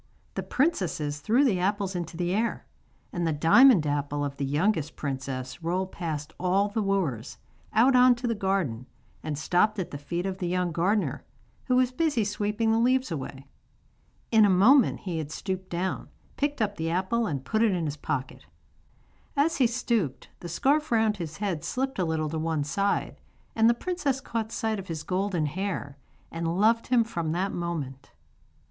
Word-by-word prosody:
The - - -2
princesses 170 - -1
threw 225 - +3
the 200 -9 +2
apples 195 0 -1
into 170 -2 -4
the 175 0 0
air, 225 +3 -1 0.5
and 175 -1 -1
the - - +1
diamond 165 - +6
apple 145 0 -1
of 140 -1 -5
the 140 - -1
youngest 155 +2 0
princess 130 -1 -4
rolled 185 +3 -1
past 155 -3 -4
all 190 +3 +2
the 215 +2 -1
wooers, 175 - -1 0.3
out 250 +5 +4
on 250 0 +7
to 240 +1 -6
the 235 - +1
garden, 190 - -1 0.3
and 150 -2 -4
stopped 180 +7 +2
at 185 - -3
the 145 - -6
feet 170 +5 -3
of 190 -1 -3
the 180 - -2
young 180 0 0
gardener, 175 - 0 0.4
who 255 - +2
was 255 0 +3
busy 290 -4 +1
sweeping 210 +2 0
the 225 - +3
leaves 255 0 +2
away. 135 -2 -5 0.9
In 220 -2 +6
a 205 - +5
moment 220 +8 +5
he 175 -4 -3
had 150 -2 -5
stooped 185 +3 -4
down, 180 +2 -3 0.3
picked 290 -4 0
up 205 -1 -3
the 160 0 -2
apple 190 +7 0
and 140 -4 -3
put 220 +9 0
it 230 -2 +4
in 175 -3 -1
his 145 -1 -3
pocket. 140 -2 -4 0.9
As 320 +4 +2
he 255 - +4
stooped 230 - -1
the 175 - -7
scarf 285 - +1
round 220 -2 +2
his 160 -4 -6
head 190 -7 -2
slipped 265 -2 -2
a 180 - +2
little 160 -1 -1
to 160 - -2
one 160 -2 0
side, 195 +8 -1 0.4
and 225 0 +5
the 235 - +3
princess 290 -2 -1
caught 230 -4 -4
sight 220 -2 -1
of 190 - -8
his 160 -2 -5
golden 185 -3 -1
hair, 170 -3 -3 0.4
and 165 +1 -2
loved 230 +2 +3
him 245 -2 +4
from 170 -8 -3
that 190 +3 -1
moment. 155 -7 -4
185 Hz, 185 wpm, -27 LUFS, 160-225 Hz, 0.9 s, on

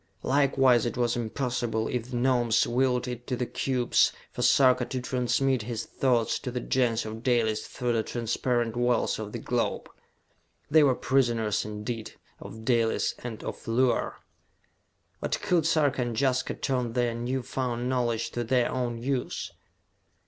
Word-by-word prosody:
Likewise 135 -3 +3
it 120 - -4
was 120 -1 +1
impossible, 120 -1 -2
if 125 -1 -3
the 125 - -3
Gnomes 120 -3 +3
willed 125 +1 +1
it 120 -1 -6
to 130 - -1
the 125 - -2
cubes, 125 0 +2 0.2
for - - -5
Sarka 125 0 +5
to 130 - -4
transmit 125 +1 0
his 115 0 -4
thoughts 120 -4 +1
to - - -5
the 125 0 -3
Gens 120 -3 0
of 110 +1 -6
Dalis 115 -4 +1
through 125 -1 -2
the 115 - +2
transparent 120 0 -1
walls 120 -1 +1
of 105 -1 -5
the - - -4
globe! - - -2 0.8
They 155 +1 +7
were 135 -4 +4
prisoners, 120 -6 +1
indeed, 105 +2 -5 0.3
of 110 0 -10
Dalis 115 -2 +2
and 115 -3 -7
of - - -7
Luar! 120 +2 +1 1.0
But - - -2
could 170 -3 +1
Sarka 145 -5 +2
and 120 -2 -2
Jaska 130 -2 +1
turn 125 -4 -1
their 120 -1 +1
new 125 +2 -2
found 125 -2 -2
knowledge 120 -3 0
to 120 - -2
their 120 +1 +1
own 120 -2 -2
use? 125 +2 -3
120 Hz, 155 wpm, -27 LUFS, 115-130 Hz, 1.0 s, They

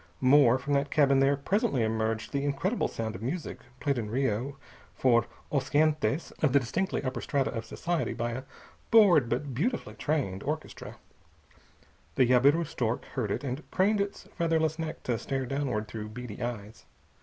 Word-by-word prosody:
More, 130 -2 +6
from 140 +3 -3
that 140 0 +1
cabin 140 -2 +4
there 140 +1 +3
presently 140 - +1
emerged 110 0 -1
the 140 0 0
incredible 145 - 0
sound 110 -1 -4
of 95 - -8
music, 155 +9 -4 0.2
played 140 -4 0
in 105 -2 -4
Rio 130 +2 -1 0.4
for 120 -2 +3 0.2
os 140 -2 0
gentes 155 +1 +1
of 150 -5 +3
the 140 - +6
distinctly 165 +11 -2
upper 130 -3 -3
strata 140 -2 0
of 115 -2 -5
society 170 +7 -2
by 120 0 -2
a 130 +2 -5 0.5
bored 180 - +6
but 130 +3 -2
beautifully 165 - -2
trained 115 -5 -1
orchestra. 155 +2 -5 1.2
The 130 - +5
jabiru 140 +7 +4
stork 120 -4 -2
heard 120 -6 -1
it, 100 - -2
and 135 +1 -3
craned 200 +2 +2
its 200 0 -4
featherless 160 -2 +1
neck 160 0 -5
to 120 -3 -1
stare 135 -1 -2
downward 130 -5 -2
through 105 -1 -6
beady 115 -1 -8
eyes. 110 -3 -6
135 Hz, 165 wpm, -29 LUFS, 120-155 Hz, 1.2 s, More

